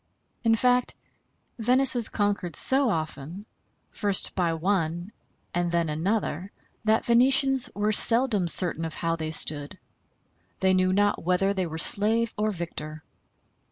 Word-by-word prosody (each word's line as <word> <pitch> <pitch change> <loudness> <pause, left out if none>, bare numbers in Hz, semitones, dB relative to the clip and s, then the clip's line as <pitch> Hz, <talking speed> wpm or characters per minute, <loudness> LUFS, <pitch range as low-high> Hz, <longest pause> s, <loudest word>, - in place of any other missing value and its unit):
In 225 -1 +3
fact, 250 +2 0 0.6
Venice 255 +4 +3
was 240 -3 +4
conquered 205 -6 -3
so 265 -1 +4
often, 160 +2 -5 0.5
first 200 -2 -1
by 175 -3 -1
one 175 +1 -2 0.4
and 175 -1 -2
then 170 -2 -1
another, 185 +3 -3 0.3
that 220 +1 +1
Venetians 265 +2 +3
were 210 +1 -1
seldom 225 -3 +4
certain 165 -1 +1
of 160 -1 -6
how 165 0 -2
they 160 -1 -5
stood. 150 -2 -1 0.8
They 190 0 +1
knew 185 0 +1
not 205 +2 0
whether 185 +3 0
they 190 -3 -3
were 160 0 -7
slave 220 +6 0
or 215 +1 -1
victor. 155 -5 -7
195 Hz, 135 wpm, -25 LUFS, 165-225 Hz, 0.8 s, was